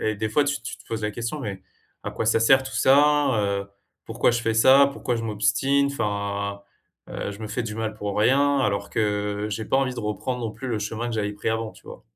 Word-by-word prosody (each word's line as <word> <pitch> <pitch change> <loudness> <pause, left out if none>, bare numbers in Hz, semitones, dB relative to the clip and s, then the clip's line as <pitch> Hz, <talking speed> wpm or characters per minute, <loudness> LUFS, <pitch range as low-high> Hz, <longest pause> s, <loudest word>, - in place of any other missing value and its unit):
et 110 - 0
des 110 +1 -3
fois 145 +5 +3
tu 140 -4 -2
tu 115 - -7
te - - -18
poses 110 -1 -3
la 105 - -1
question: 120 +7 -4
«Mais 100 -5 -5 0.4
à - - -3
quoi - - -3
ça 115 0 +3
sert 130 +3 +5
tout 135 - -8
ça, 145 +1 +4
heu? 100 -1 -1 0.4
Pourquoi - - +2
je 120 0 0
fais 115 -2 0
ça? 135 +5 +6
Pourquoi 125 -3 -2
je 115 - -4
m'obstine?» 115 +7 +1
enfin, 100 -3 -3 0.5
heu, - - -4
je 100 - -11
me 110 - -5
fais 125 +3 -2
du 105 -2 -5
mal 110 -1 -3
pour 105 -2 -4
rien, 140 +6 +3
alors 100 -5 0
que 105 -1 -1
j'ai 110 +1 -4
pas - - +2
envie 135 -1 +1
de 120 - -5
reprendre 115 +4 -3
non 110 -2 -3
plus 130 +2 -7
le 110 -3 -1
chemin 110 +3 -3
que 120 - -4
j'avais 105 -2 -1
pris 105 - -2
avant, 110 -1 -2
tu - - -20
vois? - - -10
110 Hz, 245 wpm, -24 LUFS, 105-130 Hz, 0.5 s, ça